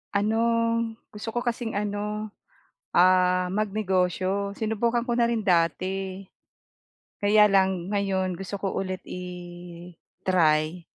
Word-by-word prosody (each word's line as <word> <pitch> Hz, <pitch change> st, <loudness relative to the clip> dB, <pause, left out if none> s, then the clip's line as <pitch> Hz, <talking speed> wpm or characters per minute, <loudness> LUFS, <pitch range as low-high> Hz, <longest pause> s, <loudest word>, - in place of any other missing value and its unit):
Ano, 215 Hz, +2 st, +2 dB, 0.7 s
gusto 210 Hz, +2 st, -7 dB
ko -, -, +2 dB
kasing 235 Hz, -2 st, -2 dB
ano, 210 Hz, +1 st, -3 dB, 0.6 s
ah, 180 Hz, 0 st, +4 dB
magnegosyo. 195 Hz, -1 st, 0 dB
Sinubukan 230 Hz, +2 st, 0 dB
ko 240 Hz, -, -1 dB
na 235 Hz, 0 st, +2 dB
rin 225 Hz, -3 st, -1 dB
dati, 185 Hz, +2 st, 0 dB, 0.9 s
kaya 210 Hz, +1 st, +5 dB
lang 190 Hz, -2 st, +2 dB
ngayon 190 Hz, -3 st, 0 dB
gusto 195 Hz, +2 st, -6 dB
ko 195 Hz, -, -2 dB
ulit 185 Hz, -1 st, -3 dB
i-try, 175 Hz, -2 st, -2 dB
195 Hz, 105 wpm, -26 LUFS, 180-210 Hz, 0.9 s, kaya